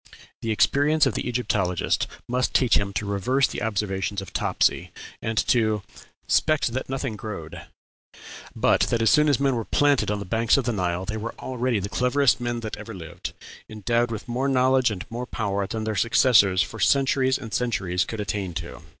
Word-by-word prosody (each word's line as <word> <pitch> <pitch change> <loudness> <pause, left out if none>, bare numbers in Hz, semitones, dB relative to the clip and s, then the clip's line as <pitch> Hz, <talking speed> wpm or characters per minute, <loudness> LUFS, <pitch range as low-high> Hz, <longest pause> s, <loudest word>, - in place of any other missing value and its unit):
The 115 - -3
experience 145 +7 +3
of 135 - +1
the - - -3
Egyptologist 105 -8 0 0.2
must 125 +1 -1
teach 125 -3 +4
him 100 -1 0
to 105 - -2
reverse 100 +7 +1
the - - -6
observation 100 -2 -2
of 95 - -9
Topsy, - - +1 0.3
and 110 0 -3
to 110 -4 +1 0.4
'`spect 155 -6 +2
that 130 +2 -4
nothing 135 -3 -3
growed,' 90 -6 -7 0.9
but - - +3
that 115 -1 +1
as 115 - +4
soon 150 0 +4
as 140 - +2
men 140 -1 +2
were 115 - -2
planted 145 0 +2
on 105 - 0
the 100 - -6
banks 115 +6 +2
of 135 - +1
the 120 - 0
Nile 90 -2 -1
they 110 +2 -4
were 110 +2 -5
already 125 -2 -2
the 100 - -3
cleverest 125 +5 +2
men 120 -1 -2
that 110 -2 -5
ever 115 - -8
lived, 80 -4 -7 0.4
endowed 115 +3 0
with 110 -2 -6
more 125 +3 -1
knowledge 130 -1 +3
and 95 -4 -5
more 120 +2 -5
power 100 -4 -2
than 110 +2 -4
their 110 -1 -2
successors 110 -5 +4
for 115 +2 -9
centuries 130 +3 +2
and 115 -5 -9
centuries 95 -7 0
could 110 - -6
attain 100 -4 -3
to. 85 0 -6
115 Hz, 190 wpm, -24 LUFS, 100-125 Hz, 0.9 s, teach